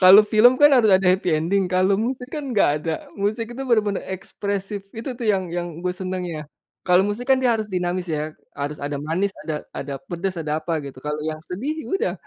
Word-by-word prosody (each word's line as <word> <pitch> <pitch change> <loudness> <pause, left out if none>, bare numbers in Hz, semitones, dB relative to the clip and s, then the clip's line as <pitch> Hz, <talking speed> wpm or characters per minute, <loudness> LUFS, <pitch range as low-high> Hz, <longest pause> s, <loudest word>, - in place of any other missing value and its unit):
Kalau 190 +3 +10
film 225 +3 +7
kan 290 0 +8
harus 220 -4 +5
ada 190 0 +4
happy 185 -2 +2
ending 175 +5 +2
kalau 185 +2 +3
musik 250 +4 -2
kan 280 -3 -4
enggak 210 - +4
ada. 160 -1 -3
Musik 215 +3 -1
itu 260 +3 -5
bener 235 -3 +5
bener 200 -2 -1
ekspresif, 200 +2 -4
itu 230 +4 -5
tuh 240 - -5
yang 190 -2 -1
yang 175 0 -2
gue 180 0 -1
seneng, 185 0 -3
ya. 155 -2 -5 0.4
Kalau 180 0 +6
musik 205 +4 -3
kan 265 - +6
dia 250 -2 +3
harus 220 - -2
dinamis 180 0 -1
ya, 155 -1 -2 0.2
harus 145 +1 -3
ada 145 0 -2
manis, 180 +6 -1
ada 155 -2 -3
ada 140 - -5
pedes, 180 +2 -3
ada 155 0 -1
apa 165 0 -1
gitu, 135 -2 -9
kalau 150 0 -2
yang 155 0 -3
sedih 220 - -3
ya - - -10
udah, 460 +5 0
185 Hz, 220 wpm, -23 LUFS, 165-215 Hz, 0.4 s, Kalau